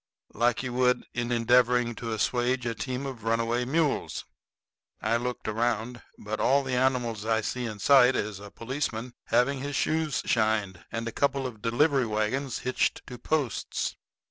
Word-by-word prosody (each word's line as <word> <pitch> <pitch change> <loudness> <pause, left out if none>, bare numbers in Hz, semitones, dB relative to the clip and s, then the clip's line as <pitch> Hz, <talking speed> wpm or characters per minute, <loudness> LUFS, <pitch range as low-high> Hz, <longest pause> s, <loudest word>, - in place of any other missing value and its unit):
like 120 +3 +1
you 125 -1 -4
would 125 0 +2
in 120 0 -2
endeavoring 120 0 +3
to 115 +1 -5
assuage 120 +3 0
a 115 - 0
team 130 +3 -4
of 130 -5 -6
runaway 115 +2 +1
mules. 150 +2 0 0.7
I 110 +2 +1
looked 125 +1 -4
around; 115 +1 -1 0.2
but 105 +1 -5
all 140 +2 +3
the 130 -1 -3
animals 125 -4 +1
I 110 0 +1
see 120 +2 -3
in 110 -2 -6
sight 130 +3 +6
is 105 -2 -2
a 100 0 -10
policeman, 120 0 -4
having 125 +4 +2
his 140 +1 -4
shoes 155 -1 0
shined, 110 -5 +1
and 115 0 -3
a - - -2
couple 140 +2 0
of 115 -5 -6
delivery 130 +3 +2
wagons 110 +5 -1
hitched 130 - 0
to 125 -1 -9
posts. 150 -6 -1
120 Hz, 165 wpm, -28 LUFS, 115-130 Hz, 0.7 s, sight